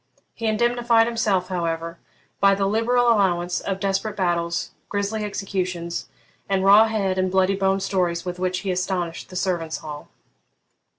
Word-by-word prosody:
He 230 - -4
indemnified 235 +1 +3
himself, 210 -6 0
however, 165 -2 -3 0.4
by 195 0 +5
the 195 0 0
liberal 230 +4 +2
allowance 180 -5 +2
of 195 -1 -3
desperate 195 +2 -1
battles, 170 -2 -1 0.2
grisly 205 +2 -2
executions, 185 -4 -3 0.4
and 195 -1 +1
raw 205 +3 +7
head 195 -4 -1
and 185 0 +1
bloody 190 +1 +2
bone 195 0 +1
stories 180 -3 -1
with 180 0 -5
which 180 0 -1
he 190 - -2
astonished 180 -2 -2
the 185 - -11
servants' 175 -4 -1
hall. 150 -1 -8
190 Hz, 145 wpm, -23 LUFS, 180-205 Hz, 0.4 s, raw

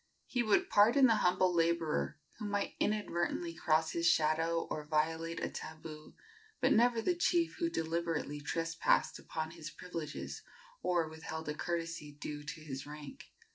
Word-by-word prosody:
He 245 - 0
would 240 - +2
pardon 235 +7 +6
the 225 -3 +5
humble 185 -1 +3
laborer 165 -2 +1 0.2
who 215 - -4
might 205 -1 -1
inadvertently 175 -5 0
cross 160 -1 +2
his 170 0 +1
shadow 165 +1 +3
or 155 - -2
violate 160 +2 0
a - - -1
tabu, 155 -1 -8 0.5
but - - +4
never 235 0 +4
the 360 - +3
chief 340 -1 +1
who 335 -1 +1
deliberately 165 - -2
trespassed 165 +2 +1
upon 160 0 -4
his 160 -2 -7
privileges 165 -2 -6 0.4
or 175 -3 +1
withheld 160 0 -6
a - - 0
courtesy 165 -2 -3
due 145 0 -6
to 155 +2 -6
his 135 -2 -6
rank. 150 - -9
165 Hz, 150 wpm, -34 LUFS, 155-185 Hz, 0.5 s, pardon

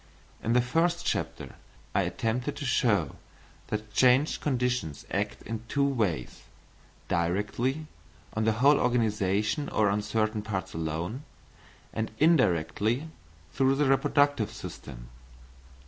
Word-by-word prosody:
In 115 - 0
the 125 0 +4
first 170 +7 +1
chapter 80 -4 -2 0.4
I - - +3
attempted 125 +5 -2
to 145 - -5
show 105 - +1 0.5
that 105 0 -4
changed 130 +6 +4
conditions 125 - -1
act - - -2
in 115 0 -5
two 140 +3 +1
ways, 105 - -1 0.7
directly 105 - 0 0.5
on 110 0 0
the 110 - +3
whole 140 +6 +5
organisation 105 0 +1
or 105 -2 +2
on 105 +1 0
certain 110 +1 0
parts 95 -3 -4
alone, 80 - -3 0.7
and 110 0 -2
indirectly 120 - +2 0.4
through 135 0 +3
the 145 +1 +2
reproductive 135 -2 +3
system. - - -9
110 Hz, 115 wpm, -28 LUFS, 100-135 Hz, 0.7 s, whole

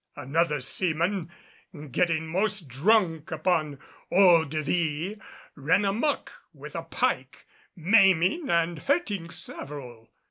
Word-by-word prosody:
Another 150 +1 0
seaman, 170 +4 -1 0.6
getting 165 +1 +1
most 190 +1 -2
drunk 165 - +1
upon 155 -6 0 0.3
eau 180 -4 +6
de 155 +1 -3
vie 170 +6 -2 0.3
ran 165 +8 +2
amuck 230 +9 -1 0.2
with - - -10
a - - -2
pike, - - -2 0.3
maiming 190 - +3
and 170 -1 +1
hurting 205 - -1
several. 125 -8 -8
170 Hz, 105 wpm, -26 LUFS, 155-195 Hz, 0.6 s, eau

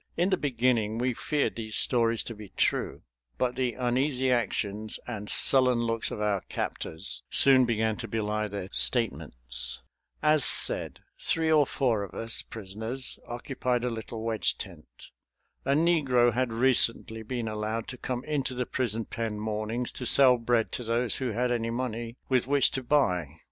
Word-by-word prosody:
In 180 +3 +1
the - - +4
beginning 120 - 0
we 125 +1 0
feared 145 +5 -1
these 110 -2 -4
stories 115 -2 +2
to 115 - -7
be 105 -2 -11
true, - - 0 0.3
but 125 -1 0
the 125 -3 -2
uneasy 130 +1 0
actions 110 -2 -1
and 105 -4 -6
sullen 130 -2 +5
looks 115 -1 -1
of - - -6
our 105 -2 0
captors 80 +6 -4
soon 130 -2 +6
began 110 -2 0
to 115 - -6
belie 105 0 -2
their 100 -2 -6
statements. 65 - -3 0.4
As 155 -1 +5
said, - - +5 0.2
three 160 -1 +1
or 150 -3 +4
four 120 -7 0
of 100 - -8
us 115 0 +3
prisoners 110 +5 -1
occupied 125 0 -3
a 125 - -1
little 110 0 -7
wedge 115 -2 -1
tent. 85 -6 -10 0.8
A 135 - +2
negro 140 -7 +3
had 125 -1 -1
recently 115 -2 +1
been 115 +1 -4
allowed 110 +1 -3
to 125 - -7
come 125 -1 -4
into 140 -4 -2
the 125 0 -2
prison 115 -4 -2
pen 115 -2 -4
mornings 110 +3 -3
to 125 - -3
sell 130 -2 +5
bread 115 -1 0
to 125 - -4
those 115 +1 0
who 130 -2 -2
had 125 +3 0
any 115 -1 -1
money 120 -1 -4
with 130 -2 +1
which 140 -1 +4
to 135 - -3
buy. 90 - 0
120 Hz, 165 wpm, -27 LUFS, 110-130 Hz, 0.8 s, soon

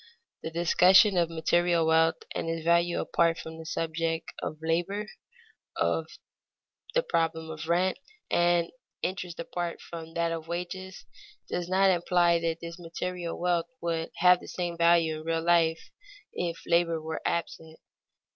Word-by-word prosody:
_ - - -23 0.4
The - - -4
discussion 180 +4 +5
of 170 -2 +2
material 170 +1 +2
wealth 160 0 +3
and 165 - -3
its 165 -1 -3
value 170 0 +3
apart 165 -1 +1
from 160 0 -8
the 160 - -9
subject 165 0 -2
of 155 - -4
labor, 175 +6 -1 0.7
of - - 0 0.9
the - - +3
problem 160 - -1
of 155 0 -7
rent 185 +5 +2 0.3
and 175 -1 +2 0.3
interest 180 -2 -4
apart 170 0 -4
from 165 -1 -9
that 170 0 0
of 165 -1 -5
wages, 185 +3 -6 0.4
does 175 0 -3
not 190 +1 +4
imply 175 -1 +3
that 165 0 -2
this 170 +1 -8
material 175 0 -5
wealth 175 -1 +1
would 165 -1 -2
have 180 0 +5
the - - -12
same 175 -1 -3
value 170 -2 +3
in - - -10
real 165 0 -1
life 165 -1 +2 0.4
if 170 -1 -3
labor 170 -1 +2
were 160 0 -5
absent. 160 -1 -3
170 Hz, 150 wpm, -28 LUFS, 165-175 Hz, 0.9 s, discussion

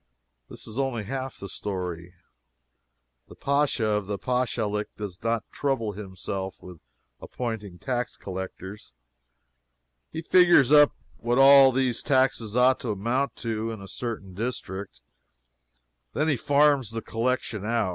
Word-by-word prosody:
This - - -10
is 110 +4 -6
only 130 -5 -1
half 130 +4 -5
the 100 - -7
story. 90 -3 -5 1.1
The - - -13
Pacha 140 -4 +1
of 105 -2 -1
a 100 - -1
Pachalic 115 -4 -1
does 100 -4 -7
not 115 -1 0
trouble 130 -7 -1
himself 95 -1 -6
with 90 -3 -12 0.4
appointing 110 -7 -5
tax 125 +2 -3
collectors. 95 -2 -8 1.2
He 160 - -6
figures 175 -7 +5
up 145 -1 +7 0.2
what 120 +1 -1
all 135 0 +8
these 130 -2 0
taxes 130 -6 +1
ought 130 +1 +4
to 120 - -5
amount 120 +7 -1
to 110 0 -2
in 110 -2 -6
a 100 - -10
certain 105 -4 -6
district. 100 - -5 1.1
Then 155 +2 +1
he 145 - +3
farms 140 -1 +3
the 115 0 -5
collection 115 -2 -2
out. 115 -2 0
115 Hz, 135 wpm, -26 LUFS, 100-130 Hz, 1.2 s, all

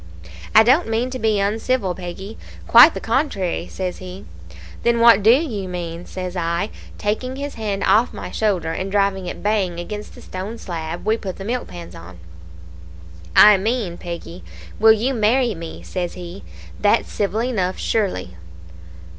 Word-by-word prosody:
"'I 220 - +9
don't 265 +9 +4
mean 230 +3 -1
to 255 - -5
be 220 -2 +1
uncivil, 210 0 0
Peggy; 185 +4 -8 0.3
quite 245 +8 +8
the - - -3
contrary,' 220 - -1
says 185 -1 -4
he. 185 +1 -9 0.6
"'Then 235 0 +2
what 230 -3 +7
do 215 - +4
you 235 - +2
mean?' 175 -1 -6
says 185 -1 -6
I, 170 +3 -1 0.3
taking 235 +5 -2
his 285 +1 -5
hand 210 -3 -3
off 225 +4 +4
my - - -7
shoulder, 190 -7 0
and 190 +4 -4
driving 195 -2 +1
it - - -7
bang 200 -5 0
against 210 +4 -7
the - - -12
stone 195 +5 -6
slab 165 -4 -6
we 220 +1 +2
put 190 -4 -6
the 195 - -8
milk 245 +3 -2
pans 170 -1 -10
on. 85 +2 -12 1.2
"'I 210 -1 +9
mean, 210 -3 -1
Peggy, 175 0 -8 0.4
will 220 +1 +7
you 230 +5 +1
marry 235 +1 +2
me?' 165 -2 -8
says 180 -2 -4
he; 180 +1 -9 0.4
'that's 210 +2 +2
civil 210 +2 -1
enough, 190 -7 -1
surely.' 185 - -1
200 Hz, 165 wpm, -21 LUFS, 180-225 Hz, 1.2 s, I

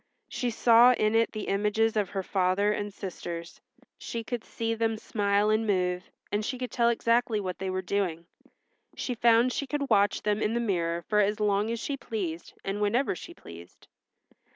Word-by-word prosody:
She 245 - -2
saw 235 +2 +6
in 215 -2 +1
it 225 0 +3
the 215 -2 -5
images 210 +3 +1
of 205 -3 0
her 195 -2 -3
father 190 +2 +1
and 205 0 -3
sisters. 170 -3 -7 0.4
She 230 -1 -5
could 235 0 -4
see 225 0 -3
them 225 -1 0
smile 205 -1 +1
and 220 +1 +1
move, 180 0 0 0.2
and 210 +1 0
she 255 +4 -3
could 250 0 -5
tell 235 -1 +3
exactly 230 -1 +1
what 185 -3 -4
they 190 0 -3
were 185 0 -2
doing. 180 -3 -2 0.7
She 250 - -3
found 235 +1 +4
she 280 - -3
could 280 -2 -3
watch 205 -1 +3
them 210 0 0
in 225 +1 0
the - - +1
mirror 170 -6 -1
for 210 +3 +1
as 210 +1 +2
long 210 0 +1
as 230 0 -2
she 275 +4 -3
pleased 195 -10 -5
and 195 +2 -2
whenever 230 +3 +1
she - - -10
pleased. 85 +1 -13
210 Hz, 190 wpm, -28 LUFS, 195-230 Hz, 0.7 s, saw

